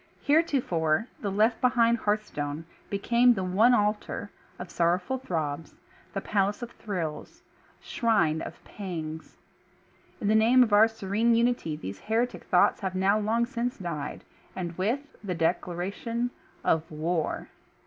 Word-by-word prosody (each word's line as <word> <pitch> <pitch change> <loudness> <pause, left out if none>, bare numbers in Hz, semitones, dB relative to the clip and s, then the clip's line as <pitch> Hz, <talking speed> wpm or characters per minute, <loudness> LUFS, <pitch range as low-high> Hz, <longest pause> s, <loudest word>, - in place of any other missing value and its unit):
Heretofore, 240 - +2
the 205 - -2
left 220 +4 +2
behind 235 -2 +3
hearthstone 165 -9 -2 0.2
became 235 +4 +3
the 190 - -2
one 210 +7 +4
altar 210 -1 -1 0.3
of 180 - -8
sorrowful 180 +10 +1
throbs, 160 - -3 0.4
the 195 - -1
palace 205 +3 0
of 235 - -6
thrills, 170 -8 -5 0.4
shrine 200 - +1
of - - -8
pangs. 160 -5 -7 0.8
In 205 - -2
the 215 - +4
name 235 +4 +6
of 220 -4 -1
our 210 +2 +7
serene 225 +1 +1
unity 235 -9 +1
these 100 -10 -7
heretic 230 +3 -1
thoughts - - +3
have 190 -2 -3
now 195 +3 +3
long 225 +3 +1
since 245 0 -3
died, 170 -6 -5 0.3
and 175 -2 -4
with 220 +10 0 0.2
the 185 -3 -3
declaration 195 +8 -1 0.3
of 160 0 +1
WAR. 160 +1 -2
205 Hz, 135 wpm, -27 LUFS, 170-235 Hz, 0.8 s, our